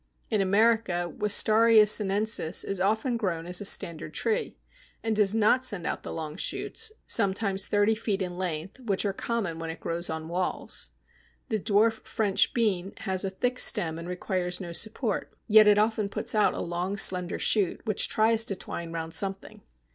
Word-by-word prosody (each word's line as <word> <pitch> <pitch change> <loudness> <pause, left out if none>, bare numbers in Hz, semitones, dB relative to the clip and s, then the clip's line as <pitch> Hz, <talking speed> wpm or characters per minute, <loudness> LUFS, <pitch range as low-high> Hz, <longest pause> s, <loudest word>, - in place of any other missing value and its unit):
In 215 -2 +1
America, 200 -3 +1
Wistaria 215 +1 +4
sinensis 205 -3 +1
is 195 -2 -3
often 220 +5 0
grown 175 -7 -3
as 180 +2 -1
a - - -5
standard 170 -4 +1
tree, 455 +1 -2 0.5
and 225 -1 -1
does 210 0 +3
not 225 +4 +3
send 205 -9 -2
out - - -3
the - - -8
long 155 0 -6
shoots, 450 - -2
sometimes 195 -2 +1
thirty 205 +1 +2
feet 215 -3 -2
in 180 -2 -4
length, 180 +3 -4
which 210 -6 -1
are 200 - -1
common 195 -6 -3
when 165 0 -5
it 160 - -7
grows 170 +1 -3
on 160 0 -5
walls. 180 +2 -3 0.6
The 220 -3 -1
dwarf 220 +2 +1
French 210 -4 +1
Bean 200 -5 -1
has 190 0 -2
a 195 - -1
thick 245 +6 -2
stem 160 -1 +3
and 170 - -8
requires 180 -1 -3
no 175 -2 -7
support, 220 +4 -1
yet 215 -1 +6
it 205 0 +5
often 215 -1 0
puts - - -2
out 215 -1 +2
a - - -4
long 175 +3 -3
slender 180 -2 +4
shoot 200 -5 +1
which 215 -3 -1
tries 225 +1 +3
to 195 - -4
twine 170 -2 -6
round 165 -1 -5
something. 195 -1 -1
200 Hz, 175 wpm, -27 LUFS, 180-220 Hz, 0.6 s, yet